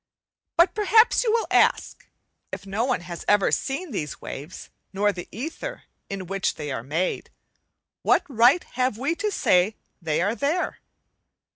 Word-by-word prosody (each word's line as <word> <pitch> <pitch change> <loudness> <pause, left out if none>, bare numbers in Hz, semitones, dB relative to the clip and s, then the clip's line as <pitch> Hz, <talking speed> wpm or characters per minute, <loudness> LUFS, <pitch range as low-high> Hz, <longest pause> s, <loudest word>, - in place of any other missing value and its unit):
But 345 +1 +5
perhaps 440 +4 +4
you 455 - +1
will 460 0 +1
ask, - - +2 0.4
if - - -6
no 200 +4 -1
one 255 -7 0
has 175 -1 -7
ever 205 -1 +4
seen 285 +5 -2
these 150 - -4
waves 150 +6 -8 0.2
not 205 +1 +1
the 175 -2 -7
ether 320 - -6 0.3
in 195 -1 -5
which 195 +1 -1
they 150 -2 -5
are 130 - -3
made, 160 +9 -2 0.7
what - - +3
right 255 +5 +4
have 255 -3 -1
we 275 +7 0
to 425 - -1
say 200 - +2 0.3
they 155 -3 0
are 200 +5 +1
there? 295 +8 -1
220 Hz, 155 wpm, -24 LUFS, -, 0.7 s, But